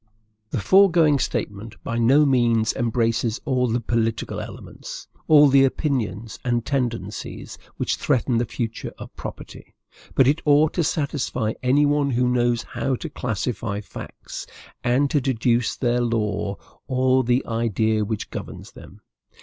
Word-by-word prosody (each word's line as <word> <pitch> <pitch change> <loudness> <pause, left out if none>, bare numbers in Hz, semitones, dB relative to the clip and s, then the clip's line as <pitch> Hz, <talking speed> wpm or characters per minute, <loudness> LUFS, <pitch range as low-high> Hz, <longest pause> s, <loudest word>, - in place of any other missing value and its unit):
The 120 - -2
foregoing 170 - +5
statement 110 -2 -3
by 115 0 -2
no 135 +6 +5
means 120 -4 +2
embraces 115 -1 0
all 130 -3 +1
the 120 +1 0
political 115 -1 -1
elements, - - -9 0.2
all 150 -2 +7
the 135 0 +5
opinions 120 - -1
and 120 -2 0
tendencies, 120 -7 -3 0.2
which - - -1
threaten 125 -3 +1
the 120 - 0
future 115 0 -4
of - - -10
property; - - -9 0.4
but 130 - +5
it 150 +4 +2
ought 150 +1 +4
to 170 - +1
satisfy 140 -8 -1
any 135 +4 +3
one 145 -1 +2
who 125 -1 +1
knows 120 -1 +1
how 135 - -2
to 155 +5 -7
classify 115 -4 -3
facts, 105 - -9 0.4
and 130 +3 +2
to 145 - +2
deduce 120 -2 +1
their 120 -1 +1
law 105 -4 -1 0.3
or 130 0 +2
the 125 +2 +1
idea 110 -1 0
which 105 0 -4
governs - - -7
them. - - -14
120 Hz, 140 wpm, -23 LUFS, 115-135 Hz, 0.4 s, all